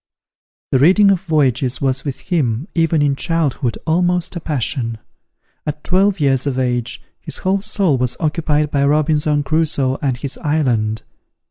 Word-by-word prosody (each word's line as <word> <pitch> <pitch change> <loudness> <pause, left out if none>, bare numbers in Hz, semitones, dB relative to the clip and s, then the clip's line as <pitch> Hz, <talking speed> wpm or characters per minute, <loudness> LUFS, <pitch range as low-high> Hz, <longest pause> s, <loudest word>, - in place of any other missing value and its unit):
The 130 - +3
reading 190 +7 +5
of 185 -3 +1
voyages 135 -7 +1
was 135 -1 -1
with 140 -3 -5
him, 140 -4 -1
even 165 -2 +2
in 140 -1 +1
childhood, 140 -7 -1
almost 175 +2 0
a - - -3
passion. 130 -6 -1 0.7
At 150 0 -4
twelve 195 +1 +2
years 135 -2 +1
of 135 -2 -1
age, 125 -2 -2 0.2
his - - -5
whole 190 +1 0
soul 195 - +1
was 125 -1 -1
occupied 150 -2 0
by 140 -1 +1
Robinson 150 0 +2
Crusoe 140 -3 0
and 135 -4 -1
his 140 +1 -4
island. 120 -8 0
145 Hz, 150 wpm, -18 LUFS, 130-165 Hz, 0.7 s, reading